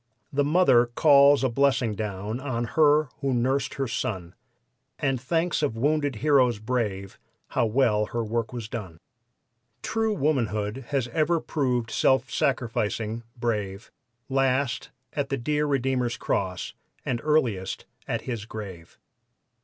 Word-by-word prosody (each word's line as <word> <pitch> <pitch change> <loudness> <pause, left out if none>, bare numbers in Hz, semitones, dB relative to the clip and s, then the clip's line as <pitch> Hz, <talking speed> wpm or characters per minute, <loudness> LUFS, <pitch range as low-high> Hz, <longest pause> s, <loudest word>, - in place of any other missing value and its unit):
The 145 +1 +2
mother 145 -6 +4
calls 140 +2 +5
a 130 - +3
blessing 130 -2 +2
down 105 +2 -4
on 130 -4 -2
her 150 -2 +4
who 135 -2 0
nursed 130 +3 0
her 135 -1 -1
son, 90 -6 -3 0.6
And 135 -4 0
thanks 165 +6 0
of 140 -7 -1
wounded 145 +1 +1
heroes 130 -6 +4
brave 105 -4 -3 0.3
how 115 - +1
well 110 -3 +2
her 115 0 -2
work 115 0 -2
was 120 -3 -5
done. 100 -8 -6 0.9
True 225 0 0
womanhood 125 - -1
has 135 -4 0
ever 160 +5 +1
prov'd 125 -8 -1
self 130 +2 +2
sacrificing, 115 -5 -1 0.2
brave 105 -3 -3 0.4
Last 135 0 0 0.2
at 140 -2 -2
the 135 - -1
dear 150 +4 0
Redeemer's 130 -3 0
Cross 90 -2 -2 0.3
and 120 -2 -1
earliest 120 -12 0 0.2
at - - -1
His 115 -4 -5
grave. 100 -7 -9
125 Hz, 130 wpm, -26 LUFS, 110-140 Hz, 0.9 s, calls